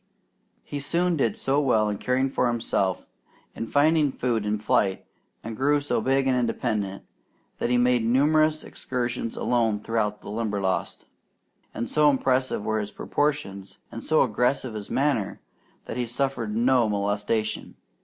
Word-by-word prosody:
He 145 - -5
soon 170 +5 +1
did 115 -8 0
so 140 +2 +1
well 110 -6 +2
in 105 -1 -3
caring 130 +1 +1
for 130 -1 0
himself, 105 -6 -1 0.5
in 115 - -5
finding 150 +1 +3
food 120 -5 -1
and 105 - +1
in - - -5
flight, 105 -4 +1 0.4
and 115 0 -6
grew 145 +4 +2
so 145 - -1
big 135 +1 +2
and 130 -1 +2
independent, 110 -5 -1 0.6
that - - 0
he 125 - +3
made 125 -1 +3
numerous 155 +6 +3
excursions 120 -2 -4
alone 115 -4 +1
through 110 -1 -1
the 105 - -9
Limberlost; 105 -4 -2 0.7
and 115 - -4
so 150 -1 +4
impressive 130 -5 +1
were 110 0 0
his 105 -1 -4
proportions, 100 -10 -2
and 115 - -7
so 155 - +3
aggressive 125 +1 0
his 105 -2 -7
manner, 135 -8 0 0.5
that - - -6
he 120 -1 -1
suffered 120 -3 -1
no 120 -1 +3
molestation. 105 +2 -1
120 Hz, 155 wpm, -25 LUFS, 105-135 Hz, 0.7 s, so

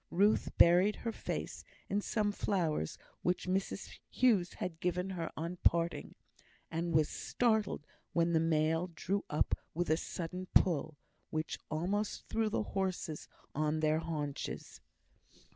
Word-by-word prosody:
Ruth 205 +4 +2
buried 180 +5 +6
her 230 - +1
face - - -4 0.2
in 205 +1 0
some 210 0 +1
flowers 170 - 0 0.2
which 180 +1 0
Mrs 190 +1 -2
Hughes 215 -9 +3
had 165 -3 -4
given 180 +2 0
her 170 -3 -3
on 170 +3 -3
parting; 170 0 +1 0.6
and 165 +1 -1
was 155 -2 +4
startled 220 -9 0 0.3
when 170 0 +2
the 160 - +5
mail 160 +1 +2
drew 195 +5 -1
up 150 - +1 0.2
with 175 -1 0
a 160 - +4
sudden 180 +2 -4
pull, 160 -4 +3 0.3
which 155 0 -2
almost 190 +7 -1
threw 225 -1 +1
the 215 - 0
horses 185 -6 -2 0.3
on 155 +1 +1
their 155 0 +3
haunches. 150 -4 -4
175 Hz, 135 wpm, -34 LUFS, 160-195 Hz, 0.6 s, buried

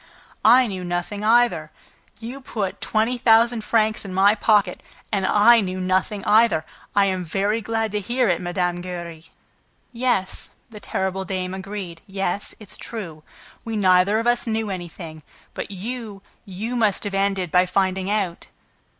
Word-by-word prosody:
"I 250 +4 +7
knew 190 -5 -5
nothing 175 +4 -3
either! 220 -9 +3 0.5
You 240 +5 -7
put 205 -7 -4
twenty 225 +3 0
thousand 230 0 +4
francs 215 -1 +1
in 190 -2 -7
my 200 +2 +5
pocket 205 -3 +2 0.3
and 195 -3 0
I 230 +3 +6
knew 185 -1 -3
nothing 185 +2 -1
either! 215 -7 +4 0.3
I 200 -1 +5
am 185 -2 -1
very 200 +6 -1
glad 225 0 -1
to 210 - -1
hear 240 +4 0
it, 175 -2 +1
Mme. 175 0 -1
Giry!" 170 -3 -7 0.7
"Yes," 235 -6 -1 0.2
the 215 - -9
terrible 190 -1 -2
dame 185 -1 -3
agreed, 190 -3 -6
"yes, 195 0 -3
it's 205 -3 -11
true. 175 -9 -7 0.4
We 225 -2 -3
neither 185 +1 +4
of 225 - -1
us 240 0 +1
knew 220 -2 -1
anything. 170 -3 -7 0.3
But - - -5
you, 205 0 -6 0.2
you 210 +5 -5
must 215 -5 +1
have 205 -2 -3
ended 195 -3 0
by 180 0 +4
finding 190 0 0
out!" 200 -5 -2
200 Hz, 155 wpm, -22 LUFS, 185-225 Hz, 0.7 s, I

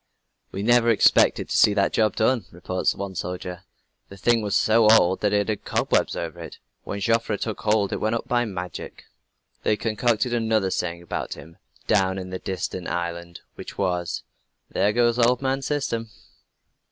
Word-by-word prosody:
"We 100 - -4
never 120 +1 +4
expected 115 - +4
to - - -1
see 105 - +5
that 100 -1 +1
job 110 -2 +2
done," 115 -2 +1
reports 90 +1 -1
one 100 -1 -5
soldier. 90 +1 -5 0.4
"The 100 - -11
thing 115 +3 +2
was 105 -2 -1
so 110 0 +4
old 95 -4 +5
that 105 - +1
it 105 0 +1
had 110 -2 -3
cobwebs - - 0
over - - -5
it. - - -9 0.3
When 100 - -5
Joffre 115 0 +1
took 110 +1 -4
hold 105 -2 +1
it - - -1
went 110 +2 0
up 115 - -4
by 120 0 +1
magic." 90 -5 -7 0.6
They 105 - +1
concocted 115 +2 0
another 110 -4 +1
saying 85 -1 -3
about - - -4
him, 80 0 -13 0.3
down 95 -2 +2
in 95 -1 -6
that 95 - -6
distant 95 -1 -4
island, 85 0 -4
which - - -10
was: 90 -3 -2 0.5
"There 100 - +2
goes 120 +1 +2
old 120 +1 +4
man 135 0 -1
System!" 125 -6 -2
105 Hz, 175 wpm, -24 LUFS, 95-115 Hz, 0.6 s, see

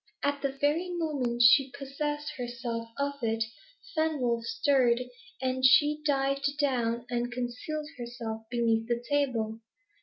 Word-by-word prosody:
At 285 0 0
the 275 -1 -2
very 315 +5 +1
moment 285 -9 0
she 260 +3 +7
possessed 295 +2 -3
herself 240 -2 -4
of 280 0 -2
it, 225 -1 +1 0.5
Fenwolf 270 -8 +1
stirred, 250 -2 +3 0.4
and 260 0 -1
she 295 +3 +6
dived 275 0 +1
down, 240 -5 0
and 240 0 -1
concealed 250 +5 -4
herself 235 -2 -5
beneath 230 -2 +1
the 235 -1 0
table. 240 -7 0
260 Hz, 125 wpm, -29 LUFS, 235-285 Hz, 0.5 s, she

